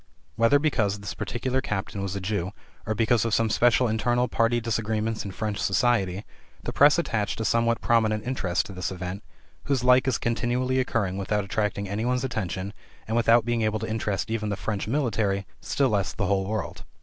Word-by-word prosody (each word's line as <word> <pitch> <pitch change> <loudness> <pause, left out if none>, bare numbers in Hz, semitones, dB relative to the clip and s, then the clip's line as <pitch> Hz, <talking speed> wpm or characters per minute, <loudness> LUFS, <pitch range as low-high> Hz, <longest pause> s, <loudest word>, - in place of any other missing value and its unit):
Whether 115 +5 +5
because 120 -9 +1
this 100 -4 -6
particular 125 +8 -2
captain 100 -4 -3
was 100 -1 -3
a - - -2
Jew, 100 -1 -2 0.3
or 110 - 0
because 115 +1 +2
of 115 -2 +1
some 115 -1 +1
special 120 +2 +4
internal 120 +3 +1
party 115 +1 +2
disagreements 110 -1 -1
in 100 - -5
French 105 +1 -3
society, 100 -3 +1 0.4
the - - -4
press 145 +3 +6
attached 115 -13 -1
a 110 - -1
somewhat 115 0 +2
prominent 110 -2 +2
interest 100 -9 -1
to 100 - -9
this 90 0 -3
event, 90 +2 -5 0.4
whose 135 -3 0
like 125 +1 +5
is 130 - +2
continually 125 +2 0
occurring 100 -7 -1
without 105 +1 0
attracting 100 0 -2
any 100 +3 -2
one's 125 +1 0
attention, 100 -5 -3 0.3
and 110 - -1
without 115 0 +4
being 120 -1 0
able 110 0 +1
to 110 +1 -4
interest 110 -2 -2
even 110 -2 -1
the 100 - -2
French 105 +1 -3
military, 110 -7 0
still 140 -2 +1
less 100 -4 0
the 105 - -2
whole 95 0 +1
world. 110 -2 -4
110 Hz, 190 wpm, -26 LUFS, 100-120 Hz, 0.4 s, press